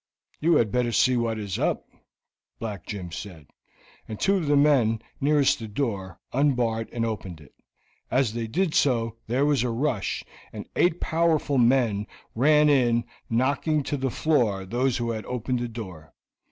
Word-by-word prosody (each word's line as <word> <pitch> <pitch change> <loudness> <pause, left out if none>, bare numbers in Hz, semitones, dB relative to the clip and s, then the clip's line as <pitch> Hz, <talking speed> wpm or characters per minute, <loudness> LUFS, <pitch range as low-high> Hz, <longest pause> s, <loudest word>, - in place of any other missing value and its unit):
"You 165 +2 +3
had 115 -7 +2
better 125 0 +1
see 130 +2 +3
what 115 -2 0
is 100 -4 -4
up," - - -1 0.7
Black 105 -4 -6
Jim 90 -4 -6
said, 85 -4 -8 0.6
and 110 - -7
two 200 +1 +3
of 165 -5 -2
the 145 0 +4
men 130 -7 +3 0.2
nearest 145 -2 +3
the 115 - -6
door 100 - -3
unbarred 120 -5 +1
and 115 -1 -1
opened 95 -7 -5
it. 75 -4 -17 0.6
As 125 -3 +1
they 115 -1 -3
did 170 +7 0
so 115 -4 +1
there 130 +5 +1
was 145 -4 +2
a 125 - 0
rush, 115 -3 -1 0.3
and - - -8
eight 175 -1 +2
powerful 160 -4 +1
men 115 -4 +2 0.3
ran 150 +5 +4
in, 120 -5 +3 0.3
knocking 140 +5 +1
to 145 - -2
the 135 -1 -1
floor 115 -10 +1
those 120 +5 0
who 120 -1 -2
had 110 -1 -4
opened 125 0 -2
the 120 - -2
door. 95 -9 -9
120 Hz, 165 wpm, -25 LUFS, 110-140 Hz, 0.7 s, the